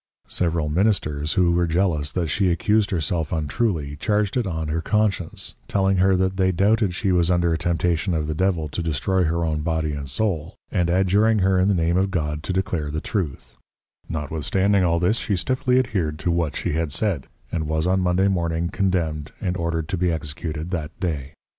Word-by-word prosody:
Several 85 -3 0
Ministers 75 -4 +1
who 90 -2 +3
were 85 0 +2
jealous 80 -4 +1
that 90 -2 0
she 95 +4 +1
accused 105 +5 +2
herself 80 -2 -1
untruly, 75 - -1
charged 105 +4 0
it 120 -5 0
on 80 -3 -3
her 80 +2 -1
Conscience, 105 -4 -1
telling 95 -1 +2
her 95 +1 +4
that 95 +1 0
they 95 -1 +3
doubted 100 +1 +2
she 100 -1 0
was 85 -1 +3
under 85 -2 +2
a - - +1
Temptation 85 +1 0
of 80 -1 -1
the 80 - -2
Devil 85 -1 0
to 80 - -3
destroy 85 +4 0
her 85 +1 0
own 75 -1 -1
Body 80 -1 -1
and 70 -1 -5
Soul, 95 -1 -1 0.2
and 90 -4 +1
adjuring 100 +5 +3
her 95 -1 +3
in 95 - +3
the 100 - +3
Name 85 +1 +1
of 95 +1 +2
God 75 -5 -2
to 85 - -4
declare 90 -5 -1
the 75 +1 -2
Truth: 85 - -4 0.5
Notwithstanding 85 +6 +1
all 85 -1 +2
this, 90 +7 +1
she 100 - -1
stifly 125 +5 +1
adhered 95 -12 0
to 85 - -1
what 85 -3 0
she - - -2
had 80 -1 -1
said, 90 -5 0 0.2
and 80 -3 -2
was 80 +1 0
on 95 +1 +2
Monday 90 +1 +2
morning 85 -3 0
Condemned, 85 -7 -1
and 90 -4 -2
ordered 85 -2 -2
to 95 - -1
be 90 0 +1
Executed 80 +1 -4
that 80 -4 -4
day. 75 -5 -3
85 Hz, 195 wpm, -23 LUFS, 80-95 Hz, 0.5 s, her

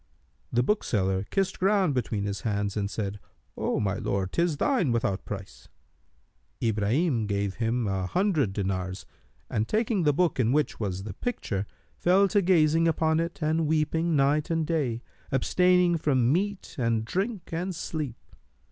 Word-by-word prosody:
The 120 +1 +2
bookseller 100 - 0
kissed 195 -1 -1
ground 195 -4 +3
between 110 -5 -1
his 100 -2 -3
hands 100 -2 -1
and 100 -2 -1
said, 105 -1 -4 0.4
"O - - -1
my 100 -2 0
lord, 95 -1 -2
'tis 170 -3 +1
thine 240 - +2
without 110 -4 -1
price.[FN#300]" 95 - -10
Ibrahim 115 - +1
gave 100 -1 -1
him 115 0 0
an 95 -2 -1
hundred 165 - +1
dinars 95 -1 -3 0.4
and 110 0 -1
taking 215 -2 +1
the 150 -3 +4
book 165 0 +1
in 120 -1 +3
which 150 +2 0
was 95 -3 -3
the 105 -1 -6
picture, 100 - -3 0.3
fell 190 +3 +4
to 205 - +3
gazing 165 -3 +4
upon 160 -1 +2
it 170 0 -3
and 160 +1 +1
weeping 160 +2 +1
night 145 +3 +2
and 165 -1 0
day, 135 -8 -1 0.3
abstaining 180 +5 +3
from 130 -4 +2
meat 200 +3 -2
and 115 -2 +1
drink 195 - -3
and 180 +2 -2
sleep. 150 -7 -4
140 Hz, 155 wpm, -27 LUFS, 105-170 Hz, 0.4 s, the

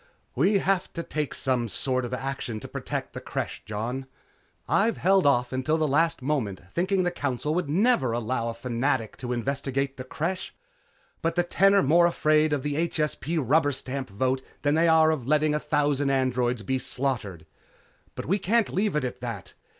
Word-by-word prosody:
"We 190 - +3
have 195 -1 0
to 170 - -4
take 150 -3 -3
some 125 -3 0
sort 130 +4 -1
of 120 - -6
action 135 -4 -4
to - - -7
protect - - -5
the - - -6
Creche, - - -4
Jon. 120 +6 -4 0.6
I've 225 +3 +2
held 190 -3 +3
off 125 -2 +2
until 130 +5 +1
the 155 -1 +1
last 160 0 +1
moment, 125 -10 -1
thinking 185 +2 +1
the 175 - +1
Council 145 -2 -2
would 175 -3 -1
never 175 - +3
allow 115 0 -1
a 115 - -5
Fanatic 120 -1 -1
to 125 -1 -5
investigate 135 +2 -2
the 130 - -5
Creche, 170 +8 -4 0.7
but 165 0 0
the 175 - +3
Ten 195 +3 +3
are 200 - +5
more 170 +5 +5
afraid 155 -2 +2
of 145 -3 0
the 150 +3 0
HSP 155 +1 -1
rubber 145 +1 +4
stamp 130 0 -5
vote 130 +6 0 0.2
than 145 0 +3
they 165 +2 +3
are 160 -1 +5
of 135 -6 -3
letting 150 +1 +3
a 150 - +1
thousand 145 -2 +1
androids 125 -3 +1
be 130 +6 -1
slaughtered. 125 -10 -2 0.7
But - - -5
we 195 +6 +1
can't 225 +4 +1
leave 200 -1 +1
it 150 - +1
at 125 - -4
that. - - -6
140 Hz, 185 wpm, -26 LUFS, 130-165 Hz, 0.7 s, are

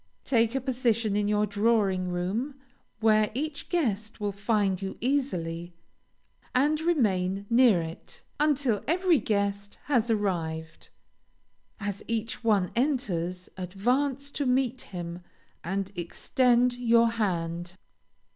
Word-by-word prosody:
Take 230 -1 +2
a 270 - 0
position 235 -5 0
in 205 0 +1
your 210 0 +2
drawing 205 -3 +1
room, 195 +11 -2 0.5
where 215 -1 +4
each 290 +2 -4
guest 225 - -1
will 205 -1 -1
find 200 -2 0
you 195 0 -5
easily, 175 -11 -2 0.8
and 295 +4 +3
remain 200 - +1
near 230 -8 +5
it, 165 0 -9 0.2
until 280 -8 +2
every 345 -1 +3
guest 200 -1 -1
has 245 -5 +1
arrived. 165 -7 -2 0.9
As 200 -1 -4
each 225 +1 -3
one 205 -5 +2
enters, 190 - -1
advance 250 +10 -1
to 285 -2 -2
meet 255 0 +1
him, 175 -1 -7 0.4
and 195 +3 -2
extend 245 +8 +2
your 235 -1 +4
hand. 175 -5 -2
215 Hz, 115 wpm, -28 LUFS, 190-250 Hz, 0.9 s, near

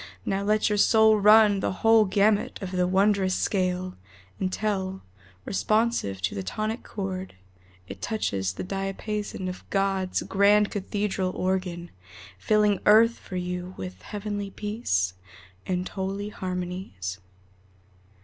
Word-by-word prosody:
Now 195 0 0
let 210 +1 +2
your 210 -1 +1
soul 220 0 +5
run 210 0 +6
the - - -1
whole 225 -1 +6
gamut 205 +2 +2
of 190 -3 -6
the 180 -1 +1
wondrous 190 0 +2
scale 185 -1 -1 0.5
Until, 190 0 -2 0.4
responsive 215 - 0
to 90 - 0
the 100 - -3
tonic 215 - -3
chord, 190 - -5 0.5
It - - -9
touches 95 - -1
the - - -5
diapason 195 +1 -4
of 185 0 -6
God's 195 -2 0
grand 205 +1 +3
cathedral 200 -1 -2
organ, 185 -2 -2 0.5
Filling 210 - +2
earth 225 +2 +6
for 185 - -9
you 180 0 -4
with 90 -1 -7
heavenly 205 - -5
peace 195 - -1 0.5
And 180 0 -1
holy 195 +1 -4
harmonies. 180 - -5
195 Hz, 120 wpm, -26 LUFS, 180-210 Hz, 0.5 s, run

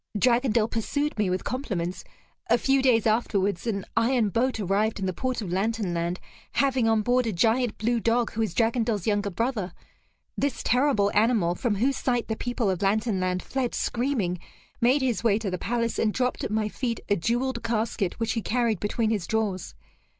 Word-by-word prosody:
Dragondel 235 -1 +3
pursued 285 +7 -2
me 205 -3 +2
with 185 0 -1
compliments. 195 -10 -3 0.5
A 235 - +5
few 270 +2 +2
days 245 -4 +3
afterwards, 205 -3 +1
an 200 -4 -2
iron 230 -1 +2
boat 235 +4 0
arrived 205 +2 0
in 195 - -2
the 185 - -1
port 255 +1 -2
of 180 - -5
Lantern 210 -1 -1
Land, 170 +1 -2 0.3
having 265 -4 +2
on 220 -1 +3
board 245 +1 +2
a - - 0
giant 225 +5 +1
blue 235 +2 +1
dog 230 +1 +1
who 225 - -3
is 215 -6 -1
Dragondel's 225 -4 +1
younger 205 -1 +1
brother. 210 -3 -2 0.6
This 280 -3 -1
terrible 245 -5 +2
animal, 210 -6 +3
from 210 +4 -1
whose 260 +7 +1
sight 245 -3 -1
the 220 - 0
people 245 -1 -2
of 185 - -3
Lantern 205 +1 +1
Land 185 0 -1
fled 260 -3 -2
screaming, 235 -8 -1 0.4
made 260 +4 +3
his 240 -5 0
way 215 -3 +3
to 215 -3 -3
the 180 - -3
palace, 230 -1 -1
and 215 - +2
dropped 250 +3 -1
at - - -2
my 215 0 0
feet 230 +1 -3
a 205 - +3
jeweled 235 +6 -1
casket, 220 -4 -1
which 225 - 0
he 230 - -1
carried 230 -3 0
between 220 +1 0
his 200 -6 -1
jaws. 210 -5 -2
225 Hz, 190 wpm, -26 LUFS, 200-245 Hz, 0.6 s, A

